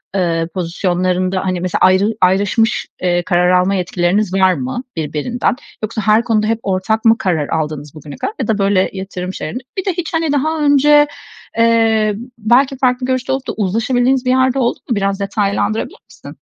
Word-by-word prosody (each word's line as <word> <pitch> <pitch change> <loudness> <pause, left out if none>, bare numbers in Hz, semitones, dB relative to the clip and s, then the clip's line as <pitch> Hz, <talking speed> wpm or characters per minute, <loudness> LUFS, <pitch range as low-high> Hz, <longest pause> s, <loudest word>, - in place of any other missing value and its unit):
ııı, 165 -3 0
pozisyonlarında 185 +1 -1
hani 185 -2 -1
mesela 180 -1 -1
ayrı 185 +2 +4
ayrışmış, 200 +4 +2 0.2
ııı, 175 -1 +1
karar 180 0 +2
alma 185 +2 +2
yetkileriniz 180 +2 0
var 190 -1 +4
mı 135 - -4
birbirinden? 160 +11 -1 0.3
Yoksa 220 0 -3
her 215 +3 +3
konuda 215 -2 +1
hep 225 0 0
ortak 200 +4 -1
mı 225 0 +5
karar 175 - -1
aldınız 150 -2 -3
bugüne 150 -1 -10
kadar 410 - -4
ya - - -2
da 220 -2 +1
böyle 195 -1 +2
yatırım 190 -1 -5
şeylerinde? 240 +11 -6
Bir 380 - -2
de 380 - 0
hiç 340 -1 -5
hani 325 -2 0
daha 310 +3 0
önce, 295 +1 +5 0.5
eee, 225 -2 +3 0.2
belki 255 +5 +2
farklı 250 -1 +1
görüşte 255 0 -1
olup 265 0 -2
da - - -2
uzlaşabildiğiniz 245 +6 +1
bir - - +1
yer 260 0 +3
de 270 - -2
oldu 240 -1 0
mu? 235 - +1
Biraz 195 0 -1
detaylandırabilir 205 +1 -1
misin? - - -13
205 Hz, 180 wpm, -16 LUFS, 185-245 Hz, 0.5 s, mı